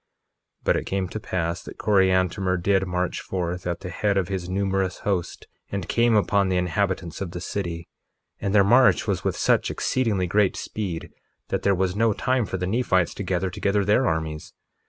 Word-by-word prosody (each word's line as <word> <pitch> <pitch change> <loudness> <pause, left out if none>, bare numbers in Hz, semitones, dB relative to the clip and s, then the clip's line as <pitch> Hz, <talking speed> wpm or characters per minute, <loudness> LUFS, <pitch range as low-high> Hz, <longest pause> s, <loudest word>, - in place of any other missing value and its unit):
1:19 - - -40
But - - +2
it - - -3
came 95 -1 -1
to 110 - -5
pass 85 -4 -2
that - - -11
Coriantumr 95 -2 +2
did 95 +1 +1
march 90 0 -2
forth 90 -1 -3
at 85 0 -3
the 90 -2 -6
head 100 +3 0
of 95 -2 0
his 95 -2 -3
numerous 95 -1 -1
host, 95 -4 -2 0.3
and 100 -4 -3
came 115 -1 +3
upon 100 -2 +2
the 90 - +1
inhabitants 90 -1 -1
of 95 - -3
the 90 - -4
city, 85 -3 -4 0.5
and 100 - -2
their 100 - +7
march 125 +6 +5
was - - -1
with - - -1
such - - +2
exceedingly 110 -8 0
great 100 +2 +2
speed 95 -6 -5 0.4
that - - -1
there 100 -1 +3
was 90 0 0
no 110 0 +3
time 125 0 0
for 95 - -3
the 90 - -2
Nephites 95 -4 +1
to - - -6
gather 95 -1 -1
together 100 +2 0
their 110 +6 +3
armies. 80 -2 -3
95 Hz, 195 wpm, -24 LUFS, 90-100 Hz, 0.5 s, their